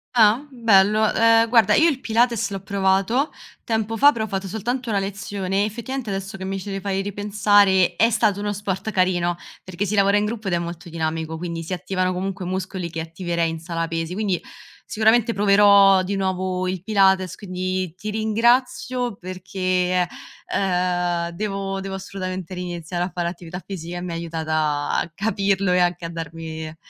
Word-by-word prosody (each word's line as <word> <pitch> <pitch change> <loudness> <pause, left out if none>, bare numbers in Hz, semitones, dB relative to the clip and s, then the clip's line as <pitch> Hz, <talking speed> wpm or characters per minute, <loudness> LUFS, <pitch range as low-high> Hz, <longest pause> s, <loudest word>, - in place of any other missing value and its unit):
Ah, 225 +3 +5
bello, 215 -3 +3
ehm, 230 0 +5
guarda 225 -4 +5
io 325 - +5
il 280 -5 0
Pilates 235 -1 +1
l'ho 195 -1 -5
provato 195 - +1 0.3
tempo 225 0 -1
fa, 285 +5 +6
però 220 -4 -3
ho - - -8
fatto 195 -1 -3
soltanto 235 +5 -3
1 205 - +1
lezione, 195 0 -2
effettivamente 235 +2 -5
adesso 195 0 -4
che 190 -1 -6
mi 195 0 -3
ci 195 +1 -5
fai 195 0 -2
ripensare 205 -2 +3
è 230 - +4
stato 205 -3 +1
uno 205 0 -2
sport 200 0 -3
carino, 180 -3 +1 0.3
perché 185 +2 -3
si 205 - -3
lavora 200 0 +4
in 205 - +1
gruppo 215 -1 -4
ed 180 - 0
è - - +1
molto 170 0 -6
dinamico, 160 0 -3
quindi 170 -1 -4
si 165 +3 -5
attivano 185 0 -1
comunque 190 +1 -3
muscoli 185 -1 -3
che 165 -1 -4
attiverei 170 0 -2
in 165 - -5
sala 165 0 -3
pesi, 165 +1 -3
quindi 200 -4 -1 0.5
sicuramente 225 +2 +3
proverò 200 -1 +6
di 190 +2 -2
nuovo 185 -1 -1
il 185 -1 -3
Pilates, 190 -3 +3
quindi 185 -2 -3
ti 210 +3 -6
ringrazio 240 +2 +1
perché 185 0 -1
è 180 - 0 0.4
ehm, 180 -2 0
devo 195 -1 -3
devo 195 0 -5
assolutamente 185 -1 -5
ri-iniziare 175 -1 -4
a 180 - -4
fare 175 -1 -1
attività 175 +1 -7
fisica 175 -2 -6
e - - -5
mi 180 -1 -5
ha - - -3
aiutata 155 -3 -1
a 170 - -4
capirlo 195 -1 0
e 180 - +3
anche 175 -1 +1
a 165 - -4
darmi 160 -1 -6
190 Hz, 175 wpm, -22 LUFS, 175-210 Hz, 0.5 s, fa